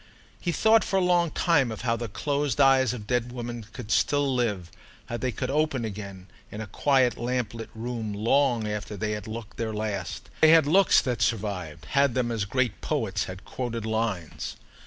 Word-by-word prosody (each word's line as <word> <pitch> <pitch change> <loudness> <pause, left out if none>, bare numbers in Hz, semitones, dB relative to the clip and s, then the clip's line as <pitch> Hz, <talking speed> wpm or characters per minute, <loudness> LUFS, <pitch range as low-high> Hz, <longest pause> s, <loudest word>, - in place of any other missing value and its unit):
He 175 - -1
thought 220 +7 +4
for - - -2
a 185 - +3
long 175 -1 +3
time 150 -8 +2
of 110 - -6
how 115 -1 +1
the 120 0 -4
closed 145 +3 -1
eyes 135 -3 +5
of 120 -4 -6
dead 125 +1 -1
women 120 -3 -6
could 115 -3 -7
still 145 +1 +2
live—how 115 -1 -4
they 130 +1 -1
could 115 - -3
open 150 -5 +1
again, 100 -3 -7 0.3
in 105 - -7
a 110 - -4
quiet 130 +2 +2
lamplit 120 -2 -2
room, 115 -1 -4
long 115 +2 +2
after 105 0 -4
they 105 +1 -2
had 105 0 -4
looked 110 0 -7
their 110 -2 -2
last. 105 -4 -4
They 160 - +8
had 160 -2 +7
looks 190 +7 +5
that 120 -5 -2
survived—had 100 - 0
them 125 -2 0
as 110 -3 -1
great 125 +1 -1
poets 110 -10 -1
had 95 +2 -9
quoted 115 -3 -4
lines. 110 -7 -2
115 Hz, 180 wpm, -26 LUFS, 105-135 Hz, 0.3 s, They